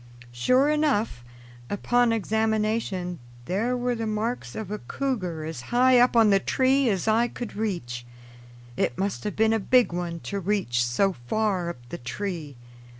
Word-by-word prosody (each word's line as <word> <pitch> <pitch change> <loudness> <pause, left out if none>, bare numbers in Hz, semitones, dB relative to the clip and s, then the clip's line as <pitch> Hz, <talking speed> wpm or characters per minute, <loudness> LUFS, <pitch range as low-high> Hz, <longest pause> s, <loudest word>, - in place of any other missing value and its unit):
Sure 255 - +3
enough, 290 - +1 0.5
upon 240 +3 +2
examination, 215 -4 0 0.3
there 225 - 0
were 245 0 0
the 225 -1 -3
marks 215 - -3
of 215 -3 -5
a 210 - -3
cougar 185 - -3
as 160 -6 -5
high 250 +1 +5
up 245 0 +4
on 225 -3 +6
the 195 - +5
tree 260 +4 +2
as 195 -1 -1
I 225 +2 +3
could 240 -1 -7
reach. 170 - -3 0.7
It 120 - -1
must 195 0 -2
have 210 - -3
been 220 +1 +3
a 225 - +2
big 245 -1 +3
one 175 -1 -3
to 200 - -4
reach 185 -11 0
so 155 +12 +1
far 195 - 0
up 120 -8 -9
the - - -6
tree. 160 +2 -5
210 Hz, 160 wpm, -26 LUFS, 175-235 Hz, 0.7 s, on